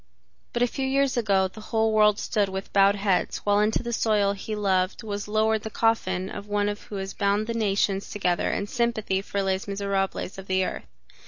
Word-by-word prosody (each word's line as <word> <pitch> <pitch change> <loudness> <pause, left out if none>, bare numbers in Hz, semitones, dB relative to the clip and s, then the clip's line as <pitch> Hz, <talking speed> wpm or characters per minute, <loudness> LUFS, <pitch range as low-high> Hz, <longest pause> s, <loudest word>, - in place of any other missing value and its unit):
But 240 - +1
a - - +4
few 265 +2 -3
years 275 0 +2
ago 200 -5 +2
the 190 +3 -12
whole 220 0 +1
world 210 -1 +4
stood 205 -2 0
with 190 +1 -6
bowed 200 0 +5
head 195 -2 0
while 205 0 +3
into 215 +3 +1
the 235 0 -3
soil 210 -3 +2
he 205 +2 -5
loved 190 -1 0
was 205 -1 -4
lowered 220 +1 +2
the 220 - -5
coffin 190 -5 0
of 205 +1 -7
one 205 0 +1
who 205 - -11
has 195 0 -4
bound 200 +1 +1
the 230 - -3
nations 200 -3 0
together 180 -4 0
in 200 - -1
sympathy 220 -4 -1
for 200 0 -2
Les 190 0 -1
Misérables 195 -1 -2
of 195 - -10
the 190 0 +1
earth. - - -5
205 Hz, 200 wpm, -25 LUFS, 195-220 Hz, -, bowed